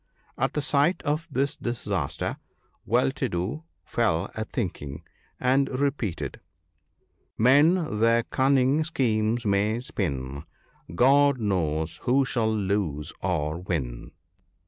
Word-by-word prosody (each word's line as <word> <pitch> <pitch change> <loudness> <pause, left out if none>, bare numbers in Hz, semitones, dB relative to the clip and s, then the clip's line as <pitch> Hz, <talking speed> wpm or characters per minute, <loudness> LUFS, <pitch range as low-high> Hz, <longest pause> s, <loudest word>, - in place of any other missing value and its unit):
At - - -1
sight 150 +5 +2
of 155 +2 -1
this 140 0 0
disaster 120 0 -3 0.5
Well 65 - +3
to - - -2
do 100 - -3 0.2
fell 100 -6 0
a 110 - -3
thinking, 80 - -4 0.4
and 135 +2 +2
repeated, 140 - -2 0.3
— 75 -3 -46
" - - -46 0.2
Men 145 - +4
their 115 +1 +4
cunning 135 +4 +2
schemes 115 -6 0
may 105 +3 +1
spin 70 - -4 0.2
— 85 - -15
God 140 +4 +5
knows 85 -6 -1
who 130 +6 +2
shall 115 -4 0
lose 95 -7 -1
or 80 -3 -1
win." 70 -10 -4
110 Hz, 120 wpm, -26 LUFS, 85-135 Hz, 0.5 s, God